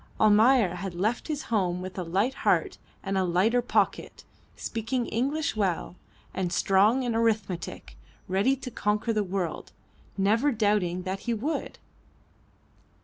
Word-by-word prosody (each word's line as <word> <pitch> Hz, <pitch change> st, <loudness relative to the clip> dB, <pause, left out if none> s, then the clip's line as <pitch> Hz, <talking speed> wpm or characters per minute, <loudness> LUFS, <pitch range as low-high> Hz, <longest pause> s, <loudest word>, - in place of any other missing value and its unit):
Almayer 215 Hz, -1 st, +5 dB
had 185 Hz, -1 st, -5 dB
left 215 Hz, +7 st, -1 dB
his 305 Hz, -2 st, -3 dB
home 185 Hz, -6 st, 0 dB
with 185 Hz, 0 st, -7 dB
a 185 Hz, -, -3 dB
light 195 Hz, +10 st, 0 dB
heart -, -, 0 dB, 0.2 s
and 195 Hz, -1 st, -1 dB
a -, -, +2 dB
lighter 190 Hz, +8 st, +2 dB
pocket, 245 Hz, -, -1 dB, 0.3 s
speaking 235 Hz, +2 st, -3 dB
English 275 Hz, +7 st, -1 dB
well, 190 Hz, -4 st, -1 dB, 0.4 s
and 185 Hz, -2 st, -2 dB
strong 205 Hz, +8 st, +3 dB
in 240 Hz, -2 st, -1 dB
arithmetic; 220 Hz, -6 st, -2 dB, 0.3 s
ready 195 Hz, +8 st, +2 dB
to 255 Hz, -1 st, -8 dB
conquer 210 Hz, +2 st, 0 dB
the 215 Hz, -1 st, +1 dB
world, 185 Hz, -3 st, -4 dB, 0.4 s
never 220 Hz, +9 st, +2 dB
doubting 205 Hz, -6 st, +1 dB
that 190 Hz, +1 st, -3 dB
he 235 Hz, +2 st, -2 dB
would. 280 Hz, +9 st, -3 dB
210 Hz, 140 wpm, -27 LUFS, 185-235 Hz, 0.4 s, Almayer